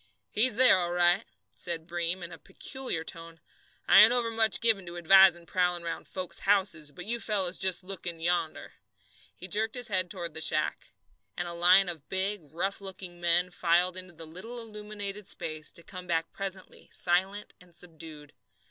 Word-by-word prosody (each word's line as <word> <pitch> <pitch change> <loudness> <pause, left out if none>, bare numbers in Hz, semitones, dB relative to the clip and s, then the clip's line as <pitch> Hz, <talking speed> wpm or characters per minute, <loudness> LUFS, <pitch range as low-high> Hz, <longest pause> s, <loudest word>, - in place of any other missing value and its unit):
"He's 225 +1 +2
there, 250 -5 +6
all 175 -1 -1
right," 175 +1 +3 0.3
said 160 +8 -3
Breem, 175 +1 -2
in 170 - -7
a 165 - -11
peculiar 265 - -5
tone. 165 -1 -4 0.5
"I - - +8
ain't 220 +2 +7
overmuch 230 -3 +2
given 225 -4 +4
to 170 +1 -7
advising 175 0 +5
prowling 180 0 0
round 170 - -6
folks' 185 -2 -4
houses, 185 -7 0
but 180 +5 -10
you 235 +3 -1
fellows 195 -5 +1
just 185 -1 +1
look 185 -2 -6
in 170 -1 -5
yonder." 170 -1 -2 0.6
He 185 - -8
jerked 220 +5 0
his 245 -2 -2
head 185 -3 0
toward 170 -4 -5
the 160 - -4
shack. - - 0 0.5
And 175 - -2
a 170 - -4
line 180 +3 +6
of 165 -5 -5
big, 190 -4 0
rough 195 +5 -3
looking 185 -2 -8
men 175 +1 +3
filed 175 +1 +1
into 185 -1 -7
the 165 0 -6
little 190 +10 -7
illumined 210 -2 -6
space, 155 -1 -3
to 170 - -12
come 180 +1 -9
back 165 -1 -2
presently 195 -1 -6
silent 190 +4 -1
and 175 -2 -19
subdued. 160 -4 -8
180 Hz, 175 wpm, -28 LUFS, 170-195 Hz, 0.6 s, I